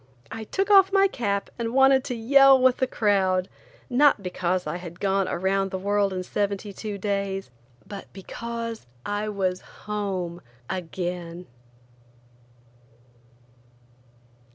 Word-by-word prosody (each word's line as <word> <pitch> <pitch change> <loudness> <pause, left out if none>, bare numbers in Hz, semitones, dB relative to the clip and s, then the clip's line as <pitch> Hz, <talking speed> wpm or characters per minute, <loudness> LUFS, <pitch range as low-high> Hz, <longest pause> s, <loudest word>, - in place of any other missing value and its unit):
I 225 -1 -6
took 390 - -1
off 390 -1 +7
my 390 0 +5
cap 200 - -2
and 230 +1 -2
wanted 270 -1 +5
to 250 - -3
yell 270 +3 +6
with 255 -1 +4
the 260 - +1
crowd, 190 -5 +1 0.4
not 260 -4 +4
because 180 0 -1
I - - -3
had 175 -1 -10
gone 195 -1 +1
around 195 +2 0
the 190 - -3
world 200 +1 +1
in 185 -1 -3
seventy 200 +1 -2
two 210 0 -5
days, 195 -4 -2 0.3
but 200 0 -9
because 230 - -6 0.2
I 205 +1 -2
was 185 -3 -1 0.2
home 190 -5 -3 0.3
again. 175 -1 -5
200 Hz, 125 wpm, -25 LUFS, 185-235 Hz, 0.4 s, off